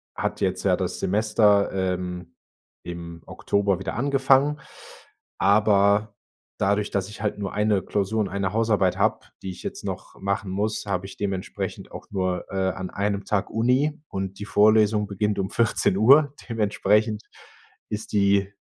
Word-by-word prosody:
hat - - -3
jetzt - - 0
ja - - +3
das - - -3
Semester, 105 0 +3 0.2
ähm, 90 -1 -6 0.5
im 85 -1 -8
Oktober 100 -2 0
wieder 95 - -4
angefangen, 140 +2 +2 0.8
aber 105 0 +3 0.4
dadurch, 100 +1 +1
dass 100 0 -2
ich 105 - -10
halt 105 -1 -1
nur 100 -2 -4
1 105 -2 +2
Klausur 105 +2 -1
und 100 - -1
1 100 0 -2
Hausarbeit 105 -5 +2
habe, - - 0 0.2
die 95 - -4
ich 90 - -10
jetzt - - -6
noch - - -6
machen 100 0 -2
muss, 105 +4 -2
habe 95 -2 -2
ich 95 - -10
dementsprechend 95 -2 -4
auch - - -10
nur, 95 -2 -1
äh, 95 -1 0
an 95 0 -6
1 100 0 -2
Tag 105 -2 -1
Uni, 130 +7 +1
und 95 0 -5
die 105 - -5
Vorlesung 105 0 +4
beginnt 105 +1 -1
um 95 0 -1
14:00. 120 +5 +4 0.2
Dementsprechend 105 0 +1 0.7
ist 105 +1 -5
die, 100 -1 +2
100 Hz, 150 wpm, -24 LUFS, 95-110 Hz, 0.8 s, Vorlesung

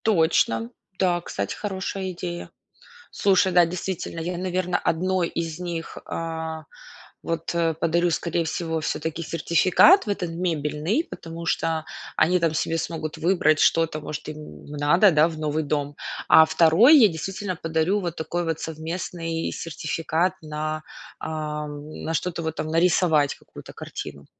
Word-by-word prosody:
Точно. 160 - +2 0.3
Да, 175 -2 +2
кстати, 100 - -4
хорошая 190 -1 -4
идея. 175 -1 -6 0.6
Слушай, 190 -1 +3
да, 175 -1 +6
действительно, 175 0 -4
я, 175 +2 -3
наверно, 180 0 -1
1 180 +1 0
из 165 -1 -4
них, 170 -2 -5
а, 160 -1 -4 0.6
вот, 165 0 -3 0.3
подарю, 170 +1 +2
скорей 170 0 -1
всего, 160 0 -2
всё-таки 160 +1 -3
сертификат 170 - +4
в - - -5
этот 185 -4 -2
мебельный, 165 - -1
потому 165 - -8
что 160 -1 0 0.3
они 180 +3 +3
там 165 -2 +1
себе 165 +1 0
смогут 160 -1 -4
выбрать 155 -2 +3
что-то, 165 -2 +3
может, 150 0 -6
им 150 - -10
надо, 150 +7 +4
да, 155 0 +5
в 165 -2 -6
новый 155 0 -1
дом. 145 -1 -2 0.3
А 160 - +8
2 170 - +6
я, 235 -6 +8
действительно, 190 +3 -4
подарю 165 +5 0
вот 175 -4 -4
такой 175 +2 -2
вот 165 -1 -2
совместный 165 +1 -4
сертификат 165 +2 -1
на, 155 0 -4 0.4
ам, 150 -1 -5
на 165 - -2
что-то, 170 +1 -2
вот 160 0 -3
там - - -3
нарисовать 160 -3 +3
какую-то - - -13
картину. 70 -1 -8
165 Hz, 140 wpm, -24 LUFS, 155-180 Hz, 0.6 s, А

